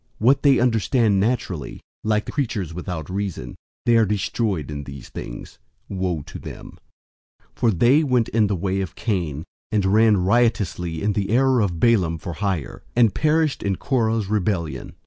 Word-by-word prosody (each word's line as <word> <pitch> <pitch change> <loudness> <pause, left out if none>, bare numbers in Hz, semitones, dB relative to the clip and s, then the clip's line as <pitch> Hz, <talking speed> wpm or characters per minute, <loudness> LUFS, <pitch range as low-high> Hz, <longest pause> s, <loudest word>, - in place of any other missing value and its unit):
What 130 +5 +3
they 140 -3 +5
understand 115 -3 +2
naturally, 95 - -2 0.2
like 110 -1 +1
the - - -6
creatures 110 - -2
without 85 -3 -5
reason, 95 -10 -4 0.3
they 120 -1 +5
are 115 - +5
destroyed 100 - -1
in 70 -1 -5
these 70 -2 -9
things. - - -8 0.3
001:011 95 - -4
Woe 90 -4 -1
to - - -9
them! - - -10 0.8
For 120 - +1
they 120 - +4
went 125 -5 +2
in 110 -2 +2
the 100 - 0
way 95 +2 -1
of 95 -4 -5
Cain, 85 - -2 0.3
and 105 -3 +1
ran 105 +2 +4
riotously 95 -5 +1
in 105 0 +1
the 100 -1 -1
error 130 +2 +3
of 90 -5 -1
Balaam 90 -7 +3
for 85 +2 -6
hire, 95 -5 -3
and 115 -4 +4
perished 155 -1 +1
in 100 -1 0
Korah's 115 -2 0
rebellion. 95 -5 -2
100 Hz, 165 wpm, -22 LUFS, 90-115 Hz, 0.8 s, they